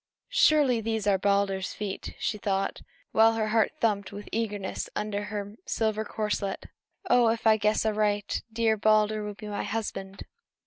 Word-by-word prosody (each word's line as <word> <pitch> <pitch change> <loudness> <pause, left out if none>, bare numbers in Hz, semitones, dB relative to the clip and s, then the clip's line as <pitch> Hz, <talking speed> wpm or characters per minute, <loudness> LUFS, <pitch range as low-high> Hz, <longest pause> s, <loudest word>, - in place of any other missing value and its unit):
"Surely, 280 -7 +4
these 220 -1 -2
are 200 -2 +3
Balder's 200 -1 +1
feet!" 205 -2 -5
she 210 - -2
thought, 195 -1 -1 0.3
while 225 +1 +5
her 220 -1 -1
heart 220 0 +3
thumped 205 -3 0
with 205 +1 -8
eagerness 205 -4 -3
under 205 -1 -2
her 205 0 -5
silver 220 -1 0
corselet. 210 -3 -3 0.4
"Oh, 245 -1 +5
if 230 0 -2
I 220 -1 +7
guess 215 +1 +1
aright, 210 -1 0
dear 225 -1 +2
Balder 215 0 +3
will 210 -1 -5
be 210 - -9
my 205 -1 -3
husband!" 195 -3 -4
210 Hz, 155 wpm, -27 LUFS, 205-220 Hz, 0.4 s, I